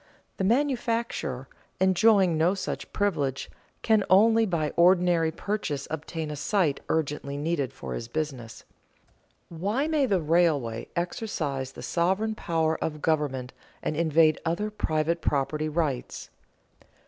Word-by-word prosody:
The - - -2
manufacturer, 230 - 0 0.3
enjoying 190 -1 +4
no 165 +5 +2
such 195 - -5
privilege, 145 -10 -1 0.3
can 220 -2 +3
only 225 +4 +5
by 160 -5 -1
ordinary 175 -2 +4
purchase 160 -7 -3
obtain 160 0 -4
a - - -4
site 150 -1 0
urgently 145 -2 -1
needed 145 -3 -1
for 135 - -7
his 115 - -5
business. 130 -4 -5 0.9
Why 205 - -1
may 305 -4 +2
the 195 -5 +2
railway 150 -8 +1
exercise 155 - -3
the - - -9
sovereign 190 +6 0
power 160 -5 -1
of 150 -1 -4
government 140 -5 0 0.3
and 155 - -1
invade 160 -1 +3
other 175 +6 -1
private 165 -4 -1
property 150 +2 0
rights? 150 -5 -3
165 Hz, 125 wpm, -27 LUFS, 150-195 Hz, 0.9 s, only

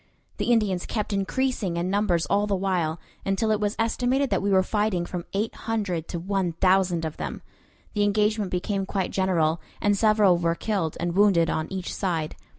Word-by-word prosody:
The - - 0
Indians 205 -6 +1
kept 210 -2 -2
increasing 200 -2 -1
in 175 +2 -1
numbers 195 -5 +1
all 205 +7 +1
the 200 - +1
while, 180 -4 -1 0.2
until 195 +3 0
it 215 - +2
was 210 0 -1
estimated 250 +4 +1
that - - +2
we 200 - 0
were 190 -1 +4
fighting 205 -4 0
from 175 -1 -5
eight 210 +3 -1
hundred 200 -8 -3
to 175 - -4
one 185 -1 -1
thousand 180 -1 +2
of 155 - -5
them. - - -5 0.5
The 210 - 0
engagement 210 0 +2
became 195 +2 -2
quite 190 -2 -2
general, 170 -4 +1 0.2
and 205 0 +2
several 210 -4 +4
were 170 -1 +1
killed 190 -6 -2
and 175 0 -1
wounded 190 -5 +4
on 155 0 -2
each 190 -2 -4
side. 165 -5 -2
195 Hz, 185 wpm, -25 LUFS, 175-210 Hz, 0.5 s, were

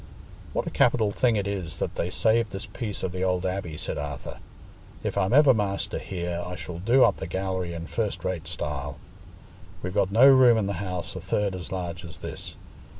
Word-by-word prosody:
"What - - -1
a - - -4
capital 110 -4 +3
thing 120 +2 +2
it 100 -2 0
is 95 -6 -3
that - - -2
they 85 - -2
saved 110 +3 +2
this 95 - -5
piece 110 -5 -5
of 90 - -1
the 90 0 -4
old 90 0 +1
abbey!" 90 -4 -3
said - - -3
Arthur. 70 -2 -6 0.6
"If - - -2
I'm 95 +3 +1
ever 140 +1 +7
master 100 -3 -1
here, 85 -2 -3
I 90 0 -5
shall 90 -1 -7
do 120 +8 +5
up 100 - +4
the - - -5
gallery 95 -1 -2
in 85 0 -5
first 100 -3 -2
rate 90 -4 -2
style. 70 -1 -4 0.9
We've 90 0 -3
got 100 -2 +2
no 115 +6 +7
room 130 -4 +8
in 110 - +1
the 100 - -1
house 90 -3 -4
a - - -5
third 100 -2 0
as 90 - -7
large 90 -2 -4
as 85 -3 -9
this. - - -7
95 Hz, 210 wpm, -26 LUFS, 85-105 Hz, 0.9 s, room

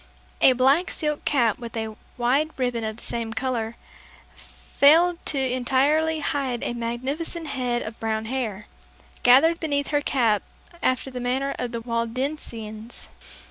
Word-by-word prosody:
A 260 - +7
black 270 +8 +3
silk 300 -1 -3
cap 245 -4 +2
with 235 -1 -7
a 220 -1 -4 0.2
wide 260 +6 +2
ribbon 245 -3 -1
of 220 0 -3
the - - -13
same 230 -1 -3
color, 235 -2 -2 0.6
failed 335 +5 +3
to 290 - +1
entirely 275 +5 +2
hide 270 -5 -1
a - - -2
magnificent 260 +8 -3
head 250 -3 -1
of 220 +1 -8
brown 220 0 -1
hair, 220 -5 -3 0.6
gathered 305 +8 +6
beneath 285 -3 -1
her 290 -1 +2
cap 230 -8 +2 0.4
after 255 +1 0
the 250 - -5
manner 260 +3 -1
of 250 - -2
the 235 -1 -4
Waldensians. 230 -2 -4
255 Hz, 140 wpm, -24 LUFS, 230-285 Hz, 0.6 s, A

